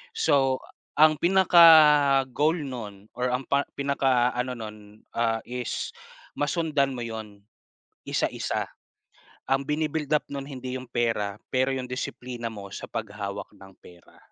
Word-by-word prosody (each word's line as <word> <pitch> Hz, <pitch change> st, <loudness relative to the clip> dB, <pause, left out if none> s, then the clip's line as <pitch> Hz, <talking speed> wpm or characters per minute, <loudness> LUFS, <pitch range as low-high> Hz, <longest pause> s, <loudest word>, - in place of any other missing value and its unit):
So, 135 Hz, -, +2 dB, 0.4 s
ang 155 Hz, 0 st, +7 dB
pinaka-goal 155 Hz, -5 st, +6 dB
noon 105 Hz, -7 st, -8 dB
or 125 Hz, 0 st, -1 dB
ang 125 Hz, +1 st, -2 dB
par 140 Hz, 0 st, +1 dB
pinakaano 130 Hz, -3 st, +1 dB
noon, 105 Hz, -1 st, -10 dB
ah, 115 Hz, -1 st, +1 dB
is 125 Hz, -1 st, -4 dB, 0.5 s
masundan 145 Hz, -2 st, 0 dB
mo 120 Hz, -, -4 dB
'yon, 110 Hz, -3 st, -8 dB, 0.6 s
isa-isa. -, -, -1 dB, 0.8 s
Ang 135 Hz, +1 st, +1 dB
bi-ni-build 150 Hz, -1 st, -1 dB
up -, -, -3 dB
noon 140 Hz, 0 st, -5 dB
hindi 130 Hz, 0 st, -6 dB
'yong 130 Hz, -1 st, -11 dB
pera, 115 Hz, -4 st, -1 dB, 0.2 s
pero 130 Hz, 0 st, +2 dB
'yong 130 Hz, -1 st, -3 dB
disiplina 125 Hz, -1 st, -5 dB
mo 100 Hz, -2 st, -9 dB
sa -, -, -7 dB
paghawak 105 Hz, -3 st, -5 dB
ng 95 Hz, 0 st, -15 dB
pera. 85 Hz, -1 st, -18 dB
130 Hz, 125 wpm, -26 LUFS, 115-140 Hz, 0.8 s, ang